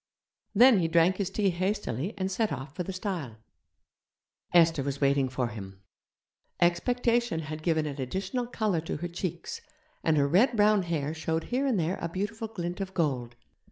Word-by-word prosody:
Then 240 0 +7
he 165 - +1
drank 170 +3 +3
his 195 -2 -1
tea 195 0 +1
hastily 185 - -2
and 190 0 -2
set 215 +3 0
off 135 +2 -5
for - - -3
the 180 - -3
stile. 180 - -4 1.1
Esther 165 -3 +5
was 140 0 -3
waiting 140 -1 +2
for 125 -2 -1
him. 95 -3 -9 0.8
Expectation 235 +2 +2
had 155 0 -6
given 160 -1 +1
an 145 -2 -4
additional 195 - -2
colour 215 -8 0
to 165 - -4
her 175 - -4
cheeks, 175 0 -5 0.4
and 160 -1 +3
her 140 -1 +3
red 220 - +3
brown 210 -1 +5
hair 160 -4 -2
showed 160 0 -2
here 270 +3 +2
and 235 -8 +2
there 170 +3 -1
a 170 - -2
beautiful 210 +6 -3
glint 180 -3 -4
of 190 -1 -5
gold. 125 -8 -1
175 Hz, 175 wpm, -28 LUFS, 150-200 Hz, 1.1 s, Then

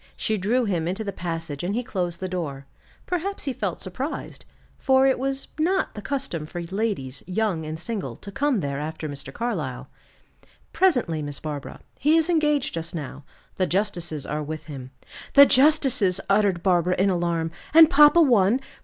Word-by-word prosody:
She 220 - -1
drew 225 +6 +1
him 170 -5 -1
into 190 +5 -2
the 200 -2 -4
passage 165 -4 -5
and 190 +4 -1
he 245 - -1
closed 180 -8 -3
the 185 - -3
door. 150 -7 -4 0.4
Perhaps 370 +3 -3
he 270 - -2
felt 200 -7 -3
surprised, 255 - -5 0.3
for 265 -1 +4
it 265 -2 +3
was 270 +1 -3
not 375 +4 +1
the 210 - -7
custom 205 - -3
for 175 - -6
ladies, 175 - -3
young 185 -5 -1
and 155 +1 -5
single, 215 +2 -4
to 200 - -11
come 270 -1 0
there 140 -1 -3
after 155 +1 -5
Mr. 140 -2 -7
Carlyle. 175 - -4 0.8
"Presently, 250 - +2
Miss 145 -1 -5
Barbara. 150 -3 -6 0.2
He 305 +3 +4
is 325 +2 +2
engaged 300 -4 +1
just 165 +1 -5
now. 145 -2 -7 0.3
The 185 - +1
justices 175 -6 -2
are 150 0 -3
with 155 +1 -6
him." 135 -4 -8 0.5
"The 280 0 +10
justices!" 265 - +3
uttered 195 -3 +2
Barbara, 180 -1 +2
in 195 +1 +3
alarm; 170 -2 -1 0.2
"and 320 +1 +9
papa 300 0 +7
one? 235 -3 +4
190 Hz, 170 wpm, -24 LUFS, 160-265 Hz, 0.8 s, The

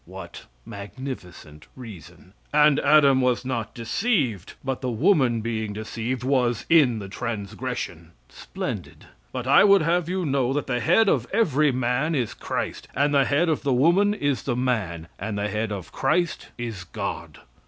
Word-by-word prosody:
[What 90 -1 -10 0.2
magnificent 100 - -9
reason!]" 90 - -12 0.2
"And 150 -1 +5
Adam 140 -2 +5
was 125 0 +1
not 120 -4 -3
deceived, 120 - -1
but 135 -1 -3
the 130 - -2
woman 125 - +2
being 110 -2 -3
deceived, 115 +3 -4
was 125 -3 +1
in 140 -8 +5
the 100 -2 -6
transgression." 105 -1 -5
[Splendid!] - - -7 0.3
"But - - -4
I - - +6
would 200 -4 +6
have 170 +1 +1
you 185 -1 -1
know 135 -3 +1
that 145 - -1
the 125 -2 -1
head 220 - +3
of 125 -10 +1
every 155 - +2
man 130 +5 0
is 125 -5 -1
Christ; - - -4
and 145 +2 +2
the 140 -1 +4
head 150 +6 +2
of 160 -2 0
the 140 -2 0
woman 175 +10 +3
is 145 - -1
the 125 - -2
man; 105 -10 -2
and 105 +1 -4
the 105 +1 -1
head 105 +1 -2
of 95 -5 -6
Christ 170 +5 0
is 115 -6 -5
God." - - -6
125 Hz, 165 wpm, -24 LUFS, 110-145 Hz, 0.3 s, I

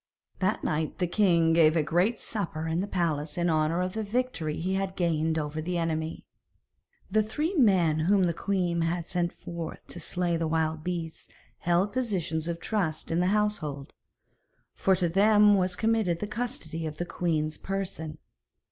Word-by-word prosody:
That 190 +3 0
night 155 0 -1
the 180 - +1
king 170 -3 +3
gave 160 -1 +5
a 155 - +3
great 180 +9 +1
supper 165 -7 -3
in 160 +1 0
the 195 - -1
palace 160 -5 -1
in 175 -1 +2
honour 155 +2 +1
of 185 0 -3
the 220 - -2
victory 210 -8 -2
he 185 +3 -1
had 190 0 -2
gained 160 -2 +1
over 155 0 -2
the 175 +2 -2
enemy. 160 -1 -2 0.9
The 215 +2 +4
three 295 - -2
men 185 - +4
whom 190 +4 +3
the 170 -1 +2
queen 180 -2 0
had 165 0 -1
sent 175 -2 0
forth 170 -2 -7
to 175 - -7
slay 175 +1 0
the 165 -1 -1
wild 160 -1 0
beasts 170 -2 -5 0.3
held 175 +4 +1
positions 185 -10 -1
of 170 -1 -3
trust 175 -7 -2
in 165 - +1
the 180 - +2
household, 190 -9 -1 0.8
for 190 - +2
to 180 -1 +1
them 205 +3 +5
was 185 -2 +2
committed 220 -6 +1
the 210 - -3
custody 205 -8 -4
of 150 -1 -7
the 175 - -2
queen's 160 -3 -1
person. 180 -5 -4
175 Hz, 175 wpm, -28 LUFS, 160-195 Hz, 0.9 s, gave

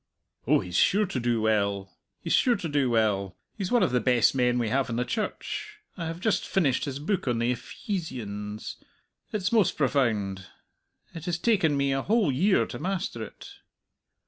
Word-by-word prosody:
"Oh, - - +4
he's 90 -1 -3
sure 210 +2 +4
to 175 -9 -3
do 120 -2 0
well, 100 -3 0 0.3
he's - - -1
sure 245 -2 +4
to 180 - -4
do 145 -4 +1
well! 105 -5 +1 0.2
He's 195 -4 -4
one 245 -2 +4
of - - +2
the 125 - +2
best 120 0 +3
men 125 -2 +2
we 120 -3 0
have 130 +3 0
in 115 - -2
the 125 +1 0
Church. 235 - -4 0.2
I 170 - -5
have 165 +1 -5
just 215 +2 0
finished 150 -9 +1
his 140 -2 -4
book 165 +3 -2
on 120 -2 +1
the 120 +2 +1
Epheesians. 115 - -5 0.5
It's 205 -2 -1
most 220 -5 +3
profound! 110 -9 0 0.7
It 165 -2 -8
has 175 -2 -1
taken 175 -8 +2
me 140 0 +1
a 135 - 0
whole 210 - +2
year 185 +10 +3
to - - -7
master 185 - -3
it." 110 - -9
135 Hz, 185 wpm, -27 LUFS, 115-185 Hz, 0.7 s, Oh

